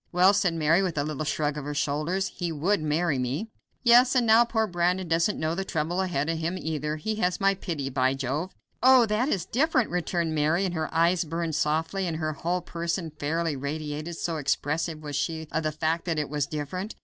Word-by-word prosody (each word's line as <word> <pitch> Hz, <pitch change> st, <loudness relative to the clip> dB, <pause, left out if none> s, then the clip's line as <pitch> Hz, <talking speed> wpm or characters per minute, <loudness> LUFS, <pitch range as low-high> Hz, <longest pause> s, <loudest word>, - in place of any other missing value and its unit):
"Well," 180 Hz, +3 st, +5 dB
said 190 Hz, -4 st, +1 dB
Mary, 165 Hz, +3 st, +3 dB
with 180 Hz, -5 st, -2 dB
a 145 Hz, -, +2 dB
little 155 Hz, 0 st, -3 dB
shrug 150 Hz, 0 st, -1 dB
of -, -, -7 dB
her 145 Hz, 0 st, -4 dB
shoulders, 155 Hz, +6 st, -1 dB
"he 175 Hz, -2 st, -4 dB
would 165 Hz, +5 st, +1 dB
marry 155 Hz, -1 st, 0 dB
me." 135 Hz, -, -3 dB, 0.3 s
"Yes, 245 Hz, +2 st, +6 dB
and 250 Hz, -2 st, +3 dB
now 225 Hz, +1 st, +7 dB
poor 225 Hz, -2 st, 0 dB
Brandon 180 Hz, -1 st, 0 dB
doesn't 165 Hz, +5 st, +1 dB
know 155 Hz, +1 st, 0 dB
the 195 Hz, +3 st, -2 dB
trouble 170 Hz, +1 st, -1 dB
ahead 165 Hz, -6 st, -1 dB
of 165 Hz, 0 st, -1 dB
him, 170 Hz, +3 st, -2 dB
either. 155 Hz, -3 st, -3 dB
He 215 Hz, +8 st, -3 dB
has 180 Hz, -4 st, 0 dB
my 195 Hz, -1 st, +3 dB
pity, 165 Hz, -7 st, -4 dB
by 130 Hz, 0 st, +1 dB
Jove!" 140 Hz, +7 st, -3 dB, 0.3 s
"Oh, 255 Hz, -1 st, +7 dB
that 220 Hz, +5 st, 0 dB
is 180 Hz, -, -1 dB
different," 260 Hz, -, +1 dB
returned 170 Hz, -2 st, -1 dB
Mary, 155 Hz, +5 st, +2 dB
and 180 Hz, -, -2 dB
her 160 Hz, -2 st, -2 dB
eyes 170 Hz, +2 st, +3 dB
burned 165 Hz, 0 st, -3 dB
softly, 160 Hz, +6 st, 0 dB
and 165 Hz, -2 st, -2 dB
her 155 Hz, -1 st, -2 dB
whole 175 Hz, +4 st, -2 dB
person 170 Hz, 0 st, -3 dB
fairly 160 Hz, +1 st, -1 dB
radiated, 150 Hz, +3 st, -4 dB
so 165 Hz, -2 st, -2 dB
expressive 155 Hz, +2 st, -1 dB
was 145 Hz, -1 st, -5 dB
she 160 Hz, +1 st, -2 dB
of 160 Hz, -, 0 dB
the 155 Hz, -1 st, -1 dB
fact 160 Hz, +2 st, -1 dB
that 165 Hz, -3 st, -1 dB
"it 150 Hz, -2 st, -1 dB
was 145 Hz, -1 st, -1 dB
different." 160 Hz, +8 st, -5 dB
165 Hz, 215 wpm, -27 LUFS, 150-185 Hz, 0.3 s, now